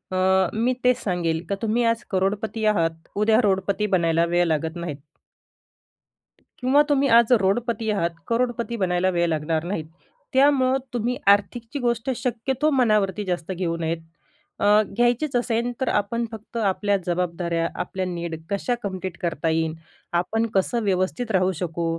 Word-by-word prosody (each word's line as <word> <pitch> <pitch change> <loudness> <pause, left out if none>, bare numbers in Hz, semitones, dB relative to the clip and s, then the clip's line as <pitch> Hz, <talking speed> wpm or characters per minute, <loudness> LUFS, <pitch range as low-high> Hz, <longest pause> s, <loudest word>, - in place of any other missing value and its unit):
अ, 190 0 +3
मी 235 +4 +1
तेच 250 0 +2
सांगेल 170 -4 -1
का 200 - 0
तुम्ही 230 +2 +1
आज 230 +1 -4
करोडपती 210 +3 -1
आहात 165 -6 0
उद्या 215 +2 +3
रोडपती 200 +1 +1
बनायला 165 -1 +2
वेळ 175 +1 +2
लागत 160 +1 -1
नाहीत. 170 -4 -5 1.6
किंवा 265 +3 +4
तुम्ही 280 -1 +3
आज 235 +1 +4
रोडपती 225 +3 0
आहात, 195 -5 +1 0.2
करोडपती 235 0 -1
बनायला 185 -2 +1
वेळ 175 -1 +1
लागणार 160 0 -1
नाहीत. 170 -3 -3 0.5
त्यामुळं 265 -1 +4 0.2
तुम्ही 240 +1 -1
आर्थिकची 225 +6 +2
गोष्ट 240 0 -1
शक्यतो 255 +4 -1
मनावरती 215 -6 +2
जास्त 180 -1 -3
घेऊ 175 -2 -2
नयेत. 165 0 -1 0.6
अ, 210 +1 +5
घ्यायचीच 245 +4 +1
असेल 240 0 0
तर - - 0
आपण 220 +3 0
फक्त 220 +1 -9
आपल्या 205 -1 +1
जबाबदाऱ्या, 170 -1 -1
आपल्या 190 -1 -3
नीड 170 -2 -4
कशा 205 +5 -1
कंप्लीट 190 -2 -4
करता 165 -2 -1
येईल? 160 0 0 0.4
आपण 215 +6 +1
कसं 230 +5 +1
व्यवस्थित 200 +4 -1
राहू 185 -1 +2
शकू? 170 -1 -2
200 Hz, 145 wpm, -23 LUFS, 175-235 Hz, 1.6 s, अ